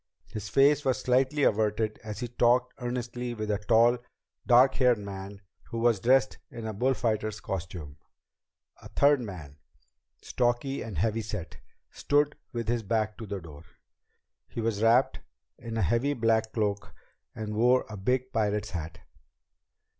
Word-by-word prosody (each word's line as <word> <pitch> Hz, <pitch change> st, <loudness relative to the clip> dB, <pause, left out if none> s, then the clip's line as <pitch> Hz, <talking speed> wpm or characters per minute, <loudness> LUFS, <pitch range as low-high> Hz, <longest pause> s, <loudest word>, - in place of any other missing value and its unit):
His 105 Hz, -1 st, -6 dB
face 145 Hz, +1 st, +4 dB
was 130 Hz, -2 st, +1 dB
slightly 130 Hz, +3 st, +1 dB
averted 110 Hz, 0 st, +1 dB
as 105 Hz, +2 st, -6 dB
he 120 Hz, -, -2 dB
talked 120 Hz, +1 st, +2 dB
earnestly 120 Hz, 0 st, -4 dB
with 110 Hz, -1 st, -3 dB
a 105 Hz, -, 0 dB
tall, 115 Hz, +3 st, +4 dB, 0.5 s
dark 125 Hz, +2 st, +6 dB
haired 125 Hz, -3 st, +3 dB
man 100 Hz, -1 st, -8 dB, 0.2 s
who 115 Hz, -, -7 dB
was 115 Hz, -3 st, +2 dB
dressed 130 Hz, +4 st, +3 dB
in 115 Hz, -4 st, -8 dB
a 110 Hz, -, -3 dB
bullfighter's 110 Hz, -2 st, 0 dB
costume. 85 Hz, -6 st, -6 dB, 0.8 s
A -, -, -11 dB
third 145 Hz, -1 st, +3 dB
man, 80 Hz, -, -8 dB, 0.6 s
stocky 125 Hz, +3 st, -1 dB
and 105 Hz, -7 st, -6 dB
heavy 110 Hz, +6 st, 0 dB
set, 105 Hz, -5 st, -6 dB, 0.3 s
stood 145 Hz, 0 st, +1 dB, 0.2 s
with 115 Hz, -3 st, -4 dB
his 120 Hz, 0 st, 0 dB
back 110 Hz, 0 st, -1 dB
to 110 Hz, -, -7 dB
the 100 Hz, -1 st, -4 dB
door. 80 Hz, -3 st, -12 dB, 0.8 s
He -, -, -7 dB
was 110 Hz, -2 st, -1 dB
wrapped 115 Hz, +4 st, +3 dB, 0.4 s
in 115 Hz, -1 st, -6 dB
a 110 Hz, -, +1 dB
heavy 120 Hz, -, +1 dB
black 110 Hz, -1 st, +1 dB
cloak 105 Hz, -2 st, -2 dB, 0.4 s
and 110 Hz, -1 st, -5 dB
wore 125 Hz, +3 st, +3 dB
a 110 Hz, -, -8 dB
big 125 Hz, +6 st, -1 dB
pirate's 105 Hz, -2 st, 0 dB
hat. 80 Hz, -3 st, -6 dB
115 Hz, 150 wpm, -28 LUFS, 105-125 Hz, 0.8 s, dark